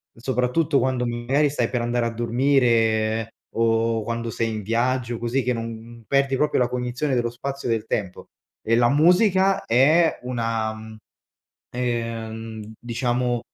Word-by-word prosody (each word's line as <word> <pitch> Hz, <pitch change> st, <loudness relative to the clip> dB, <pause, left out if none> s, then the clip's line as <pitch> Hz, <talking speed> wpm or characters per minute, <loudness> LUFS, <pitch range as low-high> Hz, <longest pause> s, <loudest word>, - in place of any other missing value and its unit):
soprattutto 130 Hz, +5 st, +1 dB
quando 130 Hz, -1 st, 0 dB
magari 130 Hz, +5 st, +1 dB
stai 125 Hz, -5 st, 0 dB
per 125 Hz, -2 st, -1 dB
andare 120 Hz, 0 st, 0 dB
a -, -, -3 dB
dormire, 115 Hz, -3 st, +2 dB, 0.3 s
o 115 Hz, 0 st, +1 dB
quando 115 Hz, 0 st, -3 dB
sei 115 Hz, +1 st, -1 dB
in 110 Hz, -2 st, -4 dB
viaggio, 120 Hz, +2 st, -1 dB
così 120 Hz, +3 st, -1 dB
che 125 Hz, 0 st, 0 dB
non 115 Hz, 0 st, -7 dB
perdi 140 Hz, -1 st, +2 dB
proprio 150 Hz, +3 st, +1 dB
la 125 Hz, -, +3 dB
cognizione 125 Hz, +3 st, -2 dB
dello 120 Hz, -1 st, 0 dB
spazio, 135 Hz, +2 st, -5 dB
del 115 Hz, -1 st, 0 dB
tempo. 100 Hz, -5 st, -3 dB, 0.4 s
E 115 Hz, -, +2 dB
la 120 Hz, 0 st, +4 dB
musica 185 Hz, -, +4 dB
è 155 Hz, +8 st, +4 dB
una 115 Hz, -3 st, -2 dB, 1.0 s
uhm, 115 Hz, -2 st, -4 dB
diciamo, 120 Hz, 0 st, -1 dB
120 Hz, 135 wpm, -23 LUFS, 115-130 Hz, 1.0 s, la